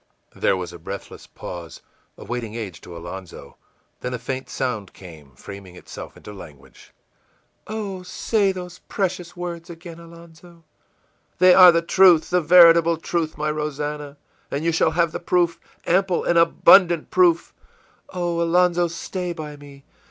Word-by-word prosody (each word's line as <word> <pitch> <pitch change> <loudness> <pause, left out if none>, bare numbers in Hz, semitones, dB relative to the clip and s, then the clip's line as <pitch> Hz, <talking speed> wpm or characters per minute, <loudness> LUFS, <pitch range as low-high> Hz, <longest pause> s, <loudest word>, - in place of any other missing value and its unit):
î - - -17
There 95 - +2
was 90 -1 -6
a 85 - -11
breathless 95 +4 -9
pause, 85 -2 -9 0.4
a - - -11
waiting 120 -3 -5
age 100 -8 -7
to 85 -1 -11
Alonzo; 85 +1 -10 0.4
then 125 0 -4
a - - -4
faint 130 +2 -6
sound 115 -7 -4
came, 80 -8 -14
framing 100 +3 -11
itself - - -11
into 105 - -11
language: 75 -8 -15 0.8
ìOh, 205 -4 -5
say 200 +2 0
those 180 -1 -9
precious 185 -3 -3
words 175 -1 -6
again, 170 0 -11
Alonzo!î 170 0 -16 0.8
ìThey 185 0 +7
are 180 -1 +9
the 170 0 0
truth, 175 -2 +4
the 180 0 +2
veritable 170 0 +6
truth, 165 -1 -3
my 150 0 -1
Rosannah, 150 -1 -5 0.3
and 145 +3 -4
you 170 - +2
shall 160 - +2
have 165 0 0
the - - -5
proof, 175 -1 0 0.3
ample 185 0 +1
and 170 -1 +2
abundant 170 0 +4
proof!î 345 -2 +2 0.6
ìOh; 175 -1 -1
Alonzo, 175 +1 +2
stay 175 +1 -5
by 155 -3 -8
me! 140 -1 -15
165 Hz, 150 wpm, -22 LUFS, 125-175 Hz, 0.8 s, are